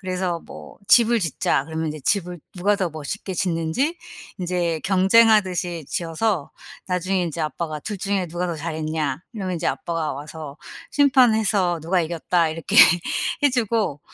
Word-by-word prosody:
그래서 185 -3 -2
뭐 75 -1 -12
"집을 235 0 +6
짓자." 155 -5 0
그러면 160 0 -3
인제 155 0 -5
집을 180 +2 -1 0.2
누가 200 +3 +2
더 185 -4 -1
멋있게 160 +6 -5
짓는지 175 - -1 0.4
인제 175 -3 -1
경쟁하듯이 190 -4 +3
지어서 170 0 -1 0.4
나중에 185 +1 0
인제 165 -1 -4
아빠가 155 0 -4
"둘 210 +6 -5
중에 195 -1 -1
누가 175 +2 -3
더 170 - -2
잘했냐?" 155 -2 -3
이러면 185 -4 -3
이제 165 - -3
아빠가 165 -2 -2
와서 150 +1 -9 0.3
심판해서 220 - +3
"누가 175 +3 +1
이겼다." 165 0 0
이렇게 165 +1 -3 0.7
해 285 - +6
주고. 225 - 0
175 Hz, 325 characters per minute, -22 LUFS, 160-200 Hz, 0.7 s, 집을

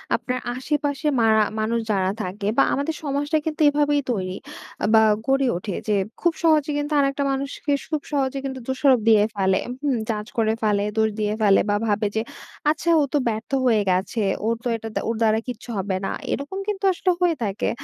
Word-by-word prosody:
আপনার 250 0 -3 0.2
আশেপাশে 290 +2 -2
মারা 220 -1 +4 0.2
মানুষ 225 +2 0
যারা 190 -2 +1
থাকে 200 +3 -4
বা - - +6
আমাদের 285 +3 -1
সমাজটাই 290 +2 0
কিন্তু 310 0 -3
এভাবেই 290 0 +2
তৈরি, 185 -4 -2 0.6
বা 220 - +7 0.2
গড়ে 270 0 +2
ওঠে 185 +1 -5
যে, 210 - +2 0.3
খুব 345 -1 +2
সহজে 310 -3 +3
কিন্তু 290 +1 -2
আরেকটা 275 0 +1
মানুষকে, 275 +2 -3
সুখ 310 -2 -2
সহজে 275 -1 0
কিন্তু 265 -1 -4
দোষারোপ 265 -1 +3
দিয়ে 215 -2 +6
ফেলে। 190 -1 +2 0.2
হুম! 275 -4 +1
জাজ 210 0 -2
করে 220 -1 +2
ফেলে, 205 -1 +2
দোষ 220 0 +3
দিয়ে 210 0 0
ফেলে 200 -2 +5
বা 205 - +2
ভাবে 210 0 +1
যে, 220 - +1 0.5
আচ্ছা 315 +2 0
ও - - +3
তো - - +4
ব্যর্থ 220 +2 -3
হয়ে 225 -4 +4
গেছে। 190 +5 0 0.3
ওরতো 230 +2 -1
এটা 225 0 -6
দা - - 0
ওর 230 - 0
দ্বারা 220 -1 +3
কিচ্ছু 245 0 -7
হবে 190 0 -1
না। - - -2 0.2
এরকম 285 +7 -3
কিন্তু 410 -1 -3
আসলে 365 +1 +1
হয়ে 350 -2 +3
থাকে। 205 -1 -1
245 Hz, 190 wpm, -23 LUFS, 215-290 Hz, 0.6 s, বা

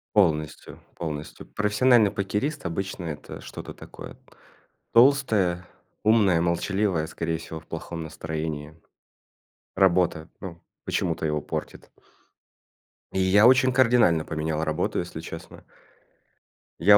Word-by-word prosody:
Полностью, 75 -6 +1 0.2
полностью. 75 -2 -6
Профессиональный 105 +1 +3
покерист- 120 +10 -2
обычно 95 0 -3
это 75 -2 -7
что-то - - -8
такое - - -11 0.8
толстое, 110 -9 +4 0.4
умное, 105 -6 +4
молчаливое, 85 0 0
скорее 80 0 -2
всего, 80 0 -8
в 80 - -21
плохом 80 0 -6
настроении. 80 -1 -5 1.0
Работа, 90 -3 +2
ну, 85 -3 -8 0.2
почему-то 80 -1 -1
его 75 -1 0
портит. - - -6 1.2
И 95 - -1
я 100 +4 +6
очень 130 0 +5
кардинально 120 -10 +4
поменял 80 0 -2
работу, 80 +2 -1
если 85 -2 -5
честно. 80 0 -9 1.2
Я 105 0 +8
85 Hz, 105 wpm, -26 LUFS, 80-105 Hz, 1.2 s, Я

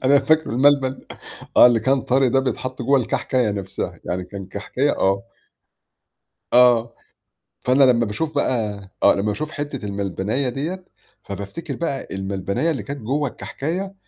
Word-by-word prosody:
أنا 140 +2 +6
فاكره 155 +3 +2
الملبن 135 +1 +3 0.6
آه - - +10
اللي 120 -2 +3
كان 135 +3 +2
طري 130 0 +2
ده 135 +2 +3
بيتحط 130 0 -3
جوّا 140 +3 +4
الكحكاية 125 -1 0
نفسها، 100 -2 -5
يعني 90 +1 -3
كان 95 +1 -8
كحكاية 115 +8 -1
آه. 95 +1 +2 1.3
آه، 120 -2 +5 0.7
فأنا 130 +2 +5
لما 120 -3 +4
باشوف 150 +10 -3
بقى 110 -7 0 0.2
آه - - +6
لما 100 - -1
باشوف 105 +9 -2
حِتّة 145 -6 -5
الملبناية 100 +6 -2
ديّة 160 +9 -4 0.4
فبافتكر 105 - -6
بقى 150 -5 -3
الملبناية 95 - -1
اللي 135 -8 -2
كانت 140 +6 -6
جوّا 140 +6 -1
الكحكاية 180 +10 -5
125 Hz, 145 wpm, -22 LUFS, 105-140 Hz, 1.3 s, آه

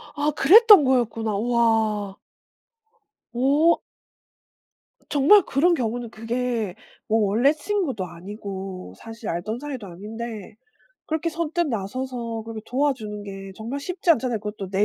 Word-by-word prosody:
아 295 +1 +1
그랬던 410 +4 +8
거였구나. 230 -4 +1
와. 220 -3 +1 1.2
오. 285 +7 +3 1.3
정말 295 +9 +6
그런 330 +6 +2
경우는 240 -4 -2
그게 230 -3 -3 0.3
뭐 220 -1 +2
원래 245 +8 +3
친구도 310 - -2
아니고 190 - -8
사실 225 -1 -8
알던 195 +8 -3
사이도 265 -7 -6
아닌데 215 +3 -8 0.5
그렇게 320 +1 -1
선뜻 335 +1 -1
나서서 230 +1 -4
그렇게 225 -1 -7
도와주는 245 -6 -1
게 195 -1 -8
정말 235 +6 -5
쉽지 355 +3 -1
않잖아요. 250 -6 +2
그것도 210 -2 -6
내 195 +1 +2
230 Hz, 265 characters per minute, -24 LUFS, 210-280 Hz, 1.3 s, 그랬던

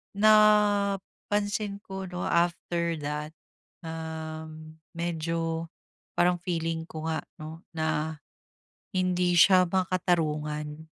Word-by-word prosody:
napansin 205 -1 +3
ko 190 -1 -6
'no, 180 0 -5
after 170 0 +1
that, 150 +2 -4 0.5
uhm, 160 -1 -7 0.2
medyo 165 -1 -2 0.5
parang 175 0 +3
feeling 165 -2 -2
ko 155 0 -7
nga 160 - 0 0.2
'no 155 +1 -8 0.2
na, 160 0 -1 0.7
hindi 180 -1 +1
siya 185 0 +7
makatarungan 155 -5 0
170 Hz, 85 wpm, -28 LUFS, 160-185 Hz, 0.7 s, siya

